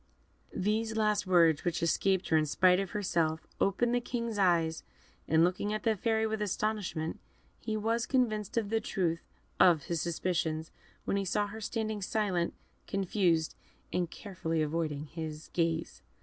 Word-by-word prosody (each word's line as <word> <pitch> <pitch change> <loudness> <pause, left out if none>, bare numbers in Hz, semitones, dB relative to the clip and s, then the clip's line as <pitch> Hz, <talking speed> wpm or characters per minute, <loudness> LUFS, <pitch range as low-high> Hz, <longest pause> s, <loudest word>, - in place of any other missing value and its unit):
These 220 +3 0
last 210 -2 +1
words, 165 -4 +4
which 175 -1 -1
escaped 190 +3 +1
her 160 - +3
in 155 -1 +2
spite 180 +4 +4
of 195 -1 -2
herself, 165 -6 0
opened 235 +5 +2
the 245 - +2
King's 235 -3 -3
eyes, 165 -4 +2 0.5
and 160 +1 +4
looking 185 +4 0
at 215 - -3
the 225 -2 +2
Fairy 220 +2 +1
with 220 -1 -2
astonishment, 200 -5 -2 0.4
he 220 -1 -2
was 230 +2 0
convinced 220 -5 0
of 215 -2 0
the 225 0 +2
truth 170 -5 -1 0.4
of 165 -5 +6
his 170 -2 -2
suspicions 165 -2 -1 0.3
when 200 - 0
he 195 - -1
saw 205 +3 +1
her 215 +2 -8
standing 220 -1 -2
silent, 190 -4 0 0.3
confused, 180 -4 +1 0.4
and 175 -2 0
carefully 165 -6 -3
avoiding 155 -1 -2
his 155 -1 -7
gaze. 165 - -1
185 Hz, 155 wpm, -31 LUFS, 165-215 Hz, 0.5 s, of